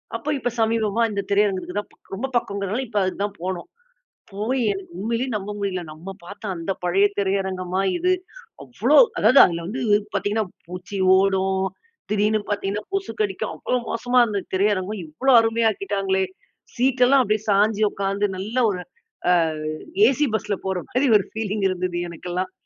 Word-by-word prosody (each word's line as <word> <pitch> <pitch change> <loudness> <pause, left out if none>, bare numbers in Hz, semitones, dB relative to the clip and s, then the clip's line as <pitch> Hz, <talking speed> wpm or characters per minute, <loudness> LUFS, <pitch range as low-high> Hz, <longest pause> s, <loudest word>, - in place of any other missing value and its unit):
அப்போ 230 +6 -4
இப்போ 245 - -1
சமீபமா 220 -1 +1
இந்த 200 -1 -1
திரையரங்குக்கு 200 -2 +1
தான், 205 - -7 0.3
ரொம்ப 255 +7 -3
பக்கம்ங்கிறதனால, 200 +2 -2
இப்ப 215 -1 -4
அதுக்கு 185 +1 -3
தான் 205 0 -4
போனோம். 185 -1 -4 0.6
போய் 225 +7 -1
எனக்கு 195 -3 -7
உண்மையிலயே 230 +5 -1
நம்ப 205 0 -4
முடியல. 195 -3 -2
"நம்ம 165 +5 -10
பாத்த 200 +5 -11
அந்த 170 +3 -3
பழைய 185 +3 +3
திரையரங்கமா 190 -1 -1 0.2
இது?" 365 +2 +2 0.5
அவ்வளோ - - +2 0.2
அதாவது, 265 - +6
அதுல 170 -1 -3
வந்து 250 +6 -4 0.3
பாத்தீங்கன்னா, 205 +2 0 0.2
பூச்சி 180 +3 -7 0.2
ஓடும். 190 0 +1 0.5
திடீர்னு 210 +1 +2
பாத்தீங்கன்னா, 205 0 -2
கொசுக்கடிக்கும். 390 +1 -2
அவ்வளோ 250 - -1
மோசமா 245 +2 +2
இருந்த 205 -3 -2
திரையரங்கம், 200 +1 0
இவ்வளோ 255 - +1
அருமையா 225 0 +2
ஆக்கிட்டாங்களே! 195 -2 -1 0.5
சீட் 255 +1 +2
எல்லாம் 270 0 +5
அப்டியே 215 0 0
சாய்ஞ்சி 210 +2 +3
உக்காந்து 200 +1 -1
நல்லா 215 +7 -1
ஒரு 180 -2 -4 0.5
அ - - +6 0.7
ஏசி 290 +3 +2
பஸ்ல 210 -1 -1
போற 190 -1 -1
மாரி 255 +4 +1
ஒரு 195 - -3
ஃபீலிங் 215 -2 -2
இருந்தது 180 -1 -2
எனக்கெல்லாம். 180 +2 -4
200 Hz, 150 wpm, -23 LUFS, 190-225 Hz, 0.7 s, அதாவது